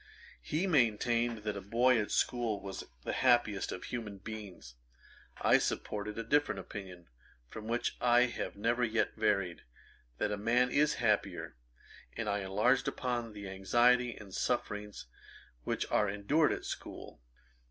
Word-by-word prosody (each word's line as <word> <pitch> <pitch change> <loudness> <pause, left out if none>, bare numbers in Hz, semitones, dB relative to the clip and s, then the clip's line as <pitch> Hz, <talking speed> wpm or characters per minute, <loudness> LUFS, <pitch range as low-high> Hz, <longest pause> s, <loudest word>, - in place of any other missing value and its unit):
He 155 - -1
maintained 120 - +2
that 105 -1 -2
a 100 - -5
boy 120 +5 +3
at 105 - -4
school 120 -4 0
was 95 -1 -6 0.2
the - - -2
happiest 120 -6 +2
of 90 - -6
human 110 -5 -5
beings. 100 - -9 0.7
I - - +5
supported 105 +1 -3
a 115 - -2
different 145 -6 +2
opinion, 90 -3 -9 0.4
from 110 0 -8
which 120 +1 -1
I 120 0 +5
have 125 0 -1
never 115 +4 0
yet 115 -1 +1
varied, 100 -5 0 0.6
that 105 - 0
a 105 - -1
man 120 +4 +2
is 150 +2 +3
happier; 105 -4 0 0.6
and 115 -2 -2
I 100 0 0
enlarged 105 +7 +2
upon 120 -3 -2
the 100 -1 -7
anxiety 120 +6 +3
and 100 -3 -12
sufferings 105 -3 -2 0.6
which - - -1
are 105 - +3
endured 120 +11 +2
at - - -3
school. - - -7
110 Hz, 145 wpm, -32 LUFS, 100-120 Hz, 0.7 s, I